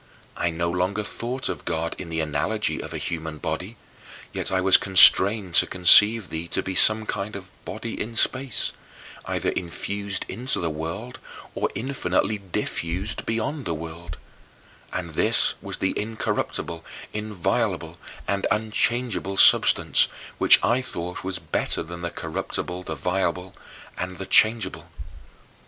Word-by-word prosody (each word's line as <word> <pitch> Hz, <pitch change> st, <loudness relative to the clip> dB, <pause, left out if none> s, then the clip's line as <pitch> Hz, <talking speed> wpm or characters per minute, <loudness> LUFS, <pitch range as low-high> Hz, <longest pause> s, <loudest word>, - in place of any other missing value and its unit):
I 85 Hz, -, 0 dB
no 85 Hz, +1 st, -2 dB
longer 90 Hz, +4 st, -1 dB
thought 125 Hz, +5 st, -3 dB
of -, -, -4 dB
God 80 Hz, 0 st, -2 dB
in 90 Hz, -, -7 dB
the 80 Hz, -1 st, -1 dB
analogy 80 Hz, +8 st, -1 dB
of -, -, -8 dB
a -, -, -4 dB
human 80 Hz, -2 st, -4 dB
body, 90 Hz, +9 st, -5 dB, 0.6 s
yet -, -, -1 dB
I 95 Hz, -, +2 dB
was 95 Hz, 0 st, +5 dB
constrained 95 Hz, 0 st, +6 dB
to -, -, -5 dB
conceive 105 Hz, +4 st, +7 dB
thee 80 Hz, +1 st, -5 dB
to -, -, -2 dB
be 95 Hz, -, -4 dB
some 110 Hz, +3 st, +2 dB
kind 100 Hz, 0 st, -4 dB
of 95 Hz, -2 st, -9 dB
body 115 Hz, +1 st, -5 dB
in 115 Hz, +2 st, -5 dB
space, 130 Hz, -1 st, 0 dB, 0.5 s
either -, -, -1 dB
infused 100 Hz, +3 st, -3 dB
into 125 Hz, +7 st, -2 dB
the 85 Hz, -2 st, -2 dB
world, 85 Hz, +12 st, -6 dB, 0.3 s
or -, -, -1 dB
infinitely 105 Hz, -3 st, -1 dB
diffused 95 Hz, +1 st, -3 dB
beyond 115 Hz, +6 st, -2 dB
the 85 Hz, -, -2 dB
world 80 Hz, -1 st, -8 dB, 0.7 s
and -, -, -5 dB
this -, -, +2 dB
was -, -, -6 dB
the -, -, -1 dB
incorruptible, 105 Hz, -6 st, -3 dB, 0.3 s
inviolable, 105 Hz, -4 st, -2 dB, 0.3 s
unchangeable 105 Hz, +1 st, -1 dB
substance, -, -, +5 dB, 0.3 s
which -, -, +8 dB
I 120 Hz, +3 st, +2 dB
thought 90 Hz, -7 st, -5 dB
was 95 Hz, 0 st, -3 dB
better 80 Hz, +1 st, -1 dB
than 85 Hz, +1 st, -9 dB
the 85 Hz, -, -3 dB
corruptible, 90 Hz, +1 st, -4 dB
the 80 Hz, -3 st, -5 dB
violable, 90 Hz, +3 st, -2 dB, 0.5 s
and 90 Hz, 0 st, -4 dB
the 95 Hz, -, -5 dB
changeable. 95 Hz, -5 st, +3 dB
95 Hz, 140 wpm, -24 LUFS, 85-110 Hz, 0.7 s, which